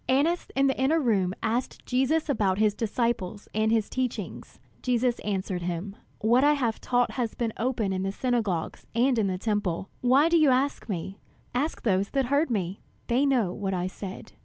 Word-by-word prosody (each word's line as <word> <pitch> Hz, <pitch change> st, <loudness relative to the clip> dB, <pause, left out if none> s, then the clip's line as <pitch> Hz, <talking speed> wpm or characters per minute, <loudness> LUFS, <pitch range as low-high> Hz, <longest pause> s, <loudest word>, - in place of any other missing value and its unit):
Annas 300 Hz, +7 st, +2 dB
in 270 Hz, +1 st, +3 dB
the 270 Hz, -1 st, +1 dB
inner 305 Hz, +5 st, +3 dB
room 200 Hz, -, +1 dB
asked 235 Hz, +3 st, -2 dB
Jesus 270 Hz, +6 st, +1 dB
about 205 Hz, -9 st, +1 dB
his 210 Hz, -1 st, +3 dB
disciples 220 Hz, -2 st, -2 dB
and 220 Hz, +1 st, +2 dB
his 225 Hz, -2 st, +2 dB
teaching. 255 Hz, -2 st, -3 dB, 0.4 s
Jesus 245 Hz, -1 st, +1 dB
answered 190 Hz, -3 st, -2 dB
him: 175 Hz, +3 st, -4 dB, 0.3 s
"What 235 Hz, +4 st, +4 dB
I 295 Hz, +1 st, +6 dB
have 240 Hz, -6 st, -1 dB
taught 245 Hz, -1 st, +1 dB
has 240 Hz, -3 st, -2 dB
been 230 Hz, -2 st, -2 dB
open 230 Hz, -5 st, 0 dB
in 185 Hz, -, -1 dB
the 195 Hz, 0 st, -1 dB
synagogues 215 Hz, -7 st, -2 dB
and 245 Hz, 0 st, +3 dB
in 205 Hz, -, +2 dB
the 185 Hz, -1 st, -1 dB
Temple. 195 Hz, -3 st, -1 dB
Why 265 Hz, +5 st, +5 dB
do 335 Hz, 0 st, +4 dB
you 305 Hz, -3 st, +5 dB
ask 260 Hz, -1 st, +1 dB
me? 190 Hz, +1 st, -4 dB, 0.3 s
Ask 285 Hz, +6 st, -1 dB
those 195 Hz, -2 st, +1 dB
that 270 Hz, -1 st, +1 dB
heard 285 Hz, +5 st, +2 dB
me; 195 Hz, -4 st, -2 dB, 0.3 s
they 255 Hz, +4 st, +2 dB
know 240 Hz, -10 st, +2 dB
what 195 Hz, -2 st, -2 dB
I 180 Hz, 0 st, -1 dB
said." 190 Hz, +1 st, -7 dB
230 Hz, 185 wpm, -27 LUFS, 195-260 Hz, 0.4 s, I